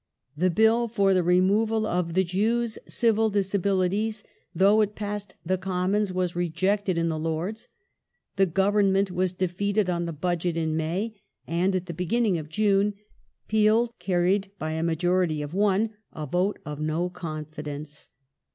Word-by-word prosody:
The 180 +5 +2
Bill 220 +6 +3
for 200 -4 +2
the 185 - +3
removal 200 +5 +2
of 175 -4 -1
the 190 - +4
Jews' 220 +6 0
Civil 225 -2 +2
Disabilities, 200 +1 0 0.3
though 200 +5 +5
it 210 0 -1
passed 205 -1 -5
the 185 +2 0
Commons, 190 +2 0
was 180 -1 -1
rejected 185 +3 0
in 165 0 +1
the 160 -1 -2
Lords; 165 +7 -3 0.7
the 195 -1 +3
Government 195 +1 +2
was 180 0 0
defeated 190 +2 0
on 170 -1 -1
the - - -3
Budget 175 +1 -1
in 160 -1 0
May, 190 +7 -2 0.2
and, 180 +3 0
at 185 -1 -1
the 170 - -6
beginning 190 +2 0
of 155 -1 -8
June, 205 +2 +2 0.5
Peel 220 +2 +3
carried 185 +2 +1
by 155 -2 -3
a 160 0 -2
majority 170 -1 +1
of 145 +2 -7
one 205 +2 +2 0.2
a 155 - -6
vote 180 +7 0
of 150 -1 -6
no 155 +3 -1
confidence. 155 -4 -7
185 Hz, 150 wpm, -26 LUFS, 170-205 Hz, 0.7 s, though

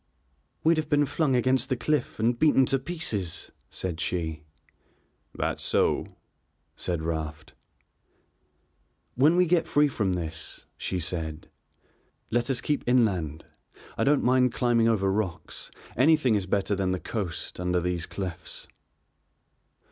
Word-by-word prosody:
"We'd 165 +1 +4
have 155 -1 -2
been 145 -1 +4
flung 145 -1 +1
against 130 +2 +2
the 130 - 0
cliff 150 -5 -1
and 120 +2 +1
beaten 145 -4 +5
to 135 +1 +1
pieces," 130 - -3 0.2
said 90 -3 -4
she. 80 -5 -2 0.9
"That's - - -2
so," - - +1 0.6
said 85 -3 -2
Raft. 80 -1 -4 1.6
"When 150 +7 +4
we 180 0 +5
get 170 -1 +2
free 145 0 +4
from 100 -9 -1
this," 80 -3 -5
she 90 - -3
said, 80 -2 -4 0.8
"let 120 +2 +1
us 130 - 0
keep 150 - -1
inland. 95 - +1 0.5
I - - 0
don't 145 +1 +3
mind 125 -1 +3
climbing 120 -2 +3
over 100 -4 +2
rocks, 95 -4 -3 0.3
anything 135 -2 +4
is 100 -3 0
better 100 +1 +1
than 95 -1 0
the 90 - -2
coast, 90 -8 -4
under 90 0 +1
these 90 -1 -2
cliffs." 90 -4 -6
110 Hz, 135 wpm, -27 LUFS, 90-135 Hz, 1.6 s, beaten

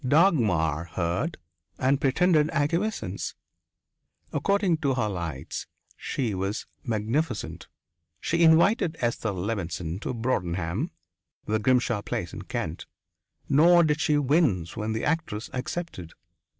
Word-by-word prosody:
Dagmar 110 - +3
heard 95 - -1 0.4
and 135 +2 +2
pretended 155 +2 +3
acquiescence. 170 +9 -1 1.0
According 200 -4 +2
to 140 -4 0
her 120 -4 +1
lights, 85 -8 -4 0.3
she 120 -6 -2
was 95 +3 -2 0.2
magnificent 120 +4 -2 0.5
she 170 +1 0
invited 165 +2 +5
Esther 115 -2 -1
Levenson 90 -3 -3
to - - -3
Broadenham, 95 - -1 0.6
the 110 +1 0
Grimshaw 120 -1 +2
place - - -4
in - - -6
Kent, 80 +3 -4 0.6
nor 170 +5 +6
did 150 0 +1
she 150 -1 +3
wince 135 - +2
when 110 0 -2
the 110 - -2
actress 145 -8 -2
accepted. 125 - -5
125 Hz, 110 wpm, -27 LUFS, 100-160 Hz, 1.0 s, nor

